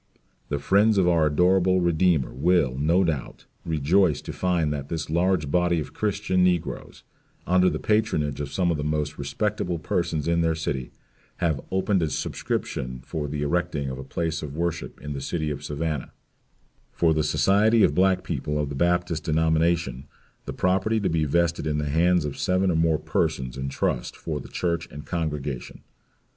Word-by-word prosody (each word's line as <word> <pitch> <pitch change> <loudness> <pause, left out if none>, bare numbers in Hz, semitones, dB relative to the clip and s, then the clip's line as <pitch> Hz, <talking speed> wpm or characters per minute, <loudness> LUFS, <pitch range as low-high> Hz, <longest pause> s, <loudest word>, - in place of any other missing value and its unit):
The 70 - 0
friends 100 +8 +3
of 95 -2 +4
our 85 -3 +4
adorable 95 +4 +3
Redeemer 85 -4 +2
will, 70 -1 +2
no 80 +7 +2
doubt, 80 -7 -3 0.2
rejoice 80 +2 +2
to - - -6
find 85 -5 0
that 70 -1 -5
this 80 -2 -4
large 85 -3 +1
body 90 0 +2
of 75 - -6
Christians 100 -3 0
negroes, 90 -2 -1 0.4
under 90 +1 +4
the - - -2
patronage 80 -11 0
of 70 -1 -5
some 85 +3 +1
of 80 - -1
the 75 - -3
most 75 -1 -2
respectable 90 +5 -2
persons 80 -2 -1
in 85 0 +2
their 80 -1 +1
city, 70 -5 -3 0.5
"have 80 -6 0
opened 95 0 +1
a 80 - 0
subscription 65 -2 -3
for 75 -2 -3
the 75 0 -3
erecting 75 -3 -1
of 65 - -6
a - - -6
place 80 +3 -3
of 75 -2 -6
worship 85 0 -3
in 75 +1 -5
the 70 - -5
city 75 +2 -2
of 70 0 -6
Savannah, 75 -1 -3 0.8
for 80 -2 +2
the 80 - +1
society 100 +10 +3
of - - +4
black 95 +2 +3
people 75 0 -3
of 75 -1 -1
the 70 - -5
Baptist 85 0 0
denomination 80 -3 +1 0.4
the - - -4
property 95 +5 +1
to 100 - 0
be 80 -1 +1
vested 85 +1 +1
in 75 -1 0
the 75 - -1
hands 85 +2 +3
of 70 - -5
seven 95 0 +2
or - - 0
more 80 -1 +3
persons 65 -4 -1
in 65 0 -3
trust 70 - -2
for 75 -3 -4
the - - -10
church 85 -2 -2
and 75 +1 -9
congregation." 75 -6 -4
80 Hz, 180 wpm, -25 LUFS, 75-90 Hz, 0.8 s, of